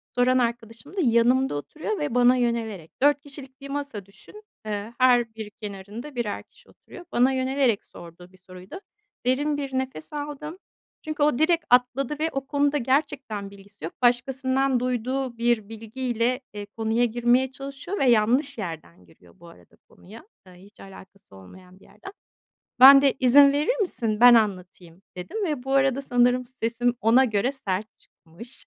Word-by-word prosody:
Soran 250 +1 +3
arkadaşım 235 - -4
da - - +1
yanımda 245 - +2
oturuyor 310 - -5
ve 295 -5 -3
bana 245 0 +5
yönelerek. 225 -8 -3
4 285 0 +3
kişilik 275 -1 -12
bir 275 - -9
masa 280 -8 -5
düşün. 420 - -16 0.2
Iıı, 210 +2 -5
her 245 -3 +3
bir 220 -2 -7
kenarında 210 +7 -9
birer 235 -4 -3
kişi - - -24
oturuyor. 355 - -15
Bana 250 +2 +3
yönelerek 260 -4 0
sorduğu 175 +2 -14
bir 185 - -21
soruydu. 185 - -12 0.5
Derin 290 +4 0
bir 275 -2 -5
nefes 260 - -5
aldım 295 +2 -6 0.4
çünkü 310 -2 -3
o 295 -4 +2
direkt 330 +1 +2
atladı 250 +4 +1
ve 320 +1 0
o 275 0 -4
konuda 285 +1 +1
gerçekten 260 -6 -2
bilgisi 200 -1 -17
yok. 165 - -7
Başkasından 260 +2 +1
duyduğu 250 0 -3
bir 235 -3 0
bilgiyle, 235 +2 -3
eee, 205 -1 -7
konuya 225 +3 -1
girmeye 240 +3 +1
çalışıyor 275 +8 -7
ve 275 - +2
yanlış 245 +5 +3
yerden 155 - -8
giriyor 85 +1 -23
bu 170 - -15
arada 170 - -19
konuya. 220 - -15 0.2
Iıı, 180 - -16
hiç 200 +4 -19
alakası 195 - -15
olmayan 180 - -16
bir - - -21
yerden. 210 - -13 0.7
Ben 275 +2 +10
de 275 -1 +3
"İzin 275 +2 +6
verir 305 +13 0
misin? 225 - -2
Ben 245 +1 +8
anlatayım." 185 -5 -1 0.2
dedim 405 - -4
ve 295 -7 -3
bu 270 +1 -3
arada 270 0 +2
sanırım 245 -1 +1
sesim 240 -1 -2
ona 235 +5 +4
göre 225 +2 0
sert 210 -6 -4
çıkmış 195 +10 -14
245 Hz, 160 wpm, -24 LUFS, 210-275 Hz, 0.7 s, Ben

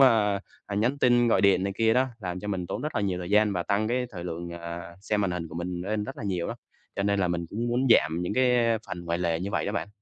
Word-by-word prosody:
ơ, 110 -6 +5 0.3
ờ, 100 - -4
nhắn 120 +7 +1
tin 120 -2 +4
gọi - - +4
điện 100 -2 +4
này 100 - -1
kia 115 0 +3
đó, 130 +1 +3
làm 90 -4 -4
cho 105 - -6
mình 95 -3 -2
tốn - - -4
rất 150 - -3
là - - +1
nhiều 95 -3 0
thời 90 0 -6
gian 105 0 +4
và 90 -2 -1
tăng 100 +4 0
cái 125 +1 0
thời 90 -6 -7
lượng, 85 0 -5
ờ, 85 0 -7
xem 105 +1 0
màn 100 -2 +1
hình 85 -2 -3
của 80 - -11
mình 85 +1 -3
lên 105 +3 -2
rất 135 - -7
là - - -7
nhiều 90 -4 -1
đó. - - -4 0.4
Cho - - 0
nên 100 0 +1
là 90 - +2
mình 85 -1 -2
cũng 115 +3 -2
muốn 125 +3 +1
giảm 80 -6 +4
những 90 +4 -2
cái 120 -2 +3
phần 90 -3 -6
ngoài 85 0 -1
lề 85 -2 0
như 95 +2 -3
vậy 85 -5 -1
đó - - -1
bạn. - - -2
100 Hz, 300 wpm, -27 LUFS, 85-110 Hz, 0.4 s, ơ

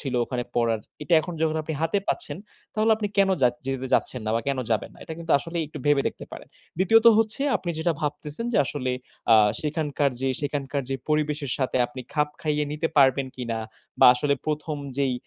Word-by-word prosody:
ছিল 135 -3 -4
ওখানে 120 -1 -3
পড়ার, 115 -2 +1 0.2
এটা 170 +3 +2
এখন 175 - -6
যখন 160 0 +1
আপনি 160 - -4
হাতে 180 +5 +1
পাচ্ছেন 350 - -2 0.4
তাহলে 220 +1 +2
আপনি 210 -2 -2
কেন 195 - +5
জাচ 120 -1 +4
যেতে 135 -1 -2
যাচ্ছেন 125 - 0
না 110 - 0
বা - - 0
কেন 135 -1 0
যাবেন 110 - 0
না? - - -18
এটা 160 - -7
কিন্তু 165 -1 -2
আসলে 165 +4 -7
একটু 150 - -9
ভেবে 145 -2 +4
দেখতে - - -11
পারেন। - - -9 0.3
২য় 225 +5 +5
ত - - +13
হচ্ছে, 225 +5 +1
আপনি 175 - -4
যেটা 165 +1 +1
ভাবতেছেন 150 +6 -4
যে - - +3
আসলে 130 -3 -2 0.4
আ - - +9 0.2
সেখানকার 150 -2 0
যে 135 - 0
সেখানকার 140 -1 -2
যে 135 - 0
পরিবেশের 150 -3 0
সাথে 130 -1 0
আপনি 130 +2 -9
খাপ 150 -1 +2
খাইয়ে 150 -1 0
নিতে 155 +2 -1
পারবেন 135 -1 +5
কিনা 115 -3 -3 0.4
বা - - +9
আসলে 140 +3 +1
১ম 150 0 -2 0.2
যেই 135 -2 +2
145 Hz, 205 wpm, -25 LUFS, 135-160 Hz, 0.4 s, ত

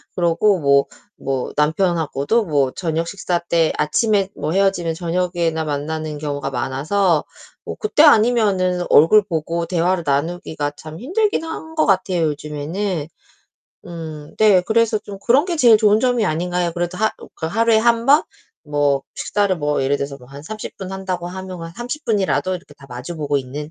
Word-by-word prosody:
그러고 180 +3 +2
뭐 140 -2 +4 0.3
뭐 135 -2 -3
남편하고도 160 +4 +1
뭐 145 -7 +1
저녁 165 -2 -2
식사 180 -2 -2
때 170 -1 +1
아침에 200 +6 +1
뭐 155 - -3
헤어지면 190 -3 +1
저녁에나 170 -1 -1
만나는 155 +1 -3
경우가 145 -2 -3
많아서 150 +7 0 0.4
뭐 - - -6
그때 425 -8 +3
아니면은 210 - +4
얼굴 205 +8 +6
보고 170 -2 -2
대화를 175 +1 0
나누기가 145 0 -2
참 155 +1 -10
힘들긴 370 - 0
한 320 0 -7
것 310 - +3
같아요 185 -3 +1
요즘에는. 150 +3 -3 0.8
음. 155 -3 -8
네, 210 -4 +6
그래서 225 +2 +2
좀 200 -2 -9
그런 265 +6 +5
게 350 -2 -2
제일 240 -7 +6
좋은 210 -1 +4
점이 245 -1 +1
아닌가요? 175 +1 -1
그래도 175 +1 -3
하 220 +2 +1 0.2
그 160 - -4
하루에 225 +5 +3
1 230 +1 +2
번? 290 +3 +6 0.4
뭐 145 -2 0
식사를 200 -2 0
뭐 145 -3 -1
예를 135 +2 +1
들어서 140 0 -5
뭐 125 -2 -16
한 140 +1 -10
30 215 +5 -7
분 190 -1 -7
한다고 185 -2 -4
하면 185 0 -7
한 165 0 -8
30 245 - -6
분이라도 190 -3 0
이렇게 175 -4 -10
다 140 -1 -16
마주 125 +7 -7
보고 145 -2 -1
있는 140 +3 -5
175 Hz, 325 characters per minute, -20 LUFS, 150-205 Hz, 0.8 s, 얼굴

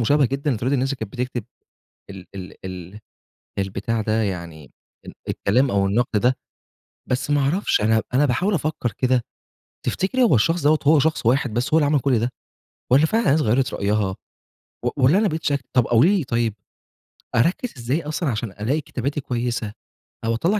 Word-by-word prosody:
مشابهة 145 +3 +3
جدًا 140 +4 -2
لطريقة 130 +3 0
الناس 135 0 +1
اللي - - -4
كانت 110 -4 -7
بتكتب 125 -3 -3 0.7
ال 95 -2 -9
ال 90 -1 -8
ال 90 +2 -8 0.6
البتاع 100 +4 -2
ده 110 +1 0
يعني، 85 -7 -5 0.3
ال - - -9 0.2
الكلام 125 +6 +1
أو 100 -1 +2
النقد 110 +1 +1
ده، 125 +1 +3 0.7
بس 135 +3 -1
ما 145 -1 +3
أعرفش 155 - +1
أنا 110 +1 +3
أنا 140 +3 +4
باحاول 160 - +1
أفكّر 150 -7 -1
كده، 125 +3 +1 0.6
تفتكري 250 +7 +1
هو 215 - +5
الشخص 165 +8 +2
دوّة 150 +1 +4
هو 150 +1 +5
شخص 160 -3 0
واحد 125 -1 +2
بس 120 +6 -1
هو - - +6
اللي 150 - +3
عمل 145 -1 +3
كلّ 130 -4 +2
ده؟ 120 +2 0 0.6
والّا 140 +5 +6
فعلًا 225 +7 +1
الناس 150 +3 +4
غيّرت 125 +3 +1
رأيها، 100 -1 0 0.7
و - - +2
والّا 135 +8 +4
أنا 215 - +3
بقيت 160 -1 -4
شاكك 140 -3 0
طب 125 -3 +4
قولي 165 - +4
لي 160 - -2
طيب، 115 -4 0 0.8
أركّز 170 - +1
إزاي 130 +7 -1
أصلًا 150 0 -2
عشان 110 -2 -3
ألاقي 120 +10 -1
كتاباتي 140 +2 -3
كويسة، 120 -4 -2 0.5
أو 115 - +1
أطلّع 185 - +1
125 Hz, 180 wpm, -22 LUFS, 110-150 Hz, 0.8 s, هو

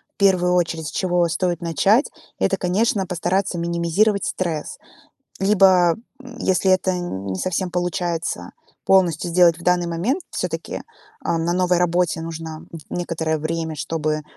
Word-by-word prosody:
в - - -61
первую 185 -3 +3
очередь, 165 -3 0
с - - -5
чего 175 -2 +1
стоит 175 +1 -1
начать- 195 - +2 0.3
это, - - +1
конечно, 195 +2 +1
постараться 180 +1 -1
минимизировать 170 +5 +1
стресс. 165 -5 -3 0.6
Либо, 190 -4 +4 0.3
м, 250 -2 -11
если 190 0 +2
это 185 0 +3
не 100 - -4
совсем 185 - -1
получается, 175 - -2 0.3
полностью 175 -3 +3
сделать 170 -1 +5
в - - -12
данный 180 -1 +2
момент, 190 - -1
всё-таки, - - -4 0.4
а, 165 - 0
на 165 +1 0
новой 180 -1 +2
работе 175 -1 +1
нужно 160 -1 -7
н 165 - -7
некоторое 160 -2 -2
время, 160 +1 -3
чтобы, 155 0 -2
175 Hz, 140 wpm, -21 LUFS, 165-185 Hz, 0.6 s, сделать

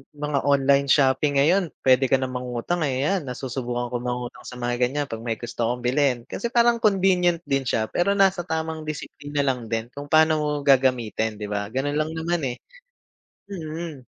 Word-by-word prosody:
mga 145 -1 -1
online 140 0 +3
shopping 140 +1 +3
ngayon 170 +6 +3 0.2
puwede 130 0 +4
ka 135 - +4
na 130 -1 -1
mangutang 125 +6 -2
ayan, 145 +6 0
nasusubukan 125 -1 -4
ko 125 - -1
mangutang 125 0 -5
sa 125 - -8
mga 120 0 -2
ganyan, 140 +3 0
pag 115 - -4
may 115 0 -3
gusto 115 0 -3
akong 125 0 -3
bilhin. 130 0 +2
Kasi 200 - -4
parang 235 0 +3
convenient 180 -5 +2
din 135 -4 -1
siya, 110 -2 0
pero 200 +3 +1
nasa 195 -3 +2
tamang 160 -1 -3
disiplina 145 -1 -4
lang 125 -4 -1
din 115 +1 -3
kung 145 +1 -8
paano 155 +1 +4
mo 150 0 -1
gagamitin 125 -5 +2
'di 105 0 -6
ba, 100 0 -2
gano'n 135 +5 -2
lang 155 +1 -1
naman, 170 +1 -1
eh. 120 - -3 1.0
Mm, 160 -4 -6
140 Hz, 180 wpm, -24 LUFS, 125-160 Hz, 1.0 s, puwede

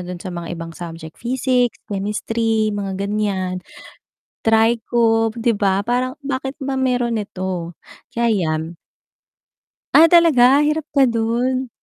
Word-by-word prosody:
do'n 180 - -5
sa 185 - -5
mga 170 -1 -6
ibang 165 0 -7
subject 165 -2 -9
Physics, 250 0 0
Chemistry, 215 +2 -1
mga 195 -2 -3
ganiyan, 195 -3 -2 0.8
Trigo, 225 0 +2
'di 230 0 0
ba, 195 -1 +1
parang 255 +2 -1
bakit 270 -1 -4
ba 270 0 -3
mayro'n 250 -3 0
ito? 185 -4 -4 0.4
Kaya 235 0 0
yan. 165 -6 -1 1.2
Ah, 320 - +8
talaga 295 -6 +5
hirap 300 +1 0
ka 275 -3 +4
do'n? 240 +3 -1
225 Hz, 120 wpm, -20 LUFS, 195-255 Hz, 1.2 s, Ah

